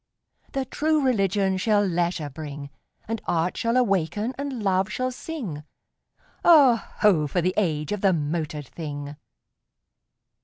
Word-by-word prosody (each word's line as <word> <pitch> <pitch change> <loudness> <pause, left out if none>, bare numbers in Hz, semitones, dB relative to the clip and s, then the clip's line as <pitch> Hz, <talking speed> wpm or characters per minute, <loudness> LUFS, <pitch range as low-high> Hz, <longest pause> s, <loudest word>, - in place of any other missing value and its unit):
The 270 -1 -1
True 305 +2 +1
Religion 195 -5 +1
shall 205 +1 +2
leisure 170 -4 -1
bring; 145 -1 -7 0.4
And 225 0 -3
Art 175 +1 0
shall 230 +2 0
awaken 205 0 +1
and 270 -4 -4
Love 190 -1 +1
shall 255 +3 -1
sing: 245 - -6 0.8
Oh, 285 -8 +7 0.2
ho! 175 -8 +4
for 160 - -1
the 180 +2 +1
age 155 -7 0
of 210 -2 -2
the 195 - +4
motored 155 -2 -2
thing! 145 -3 -6
190 Hz, 130 wpm, -25 LUFS, 160-235 Hz, 0.8 s, Oh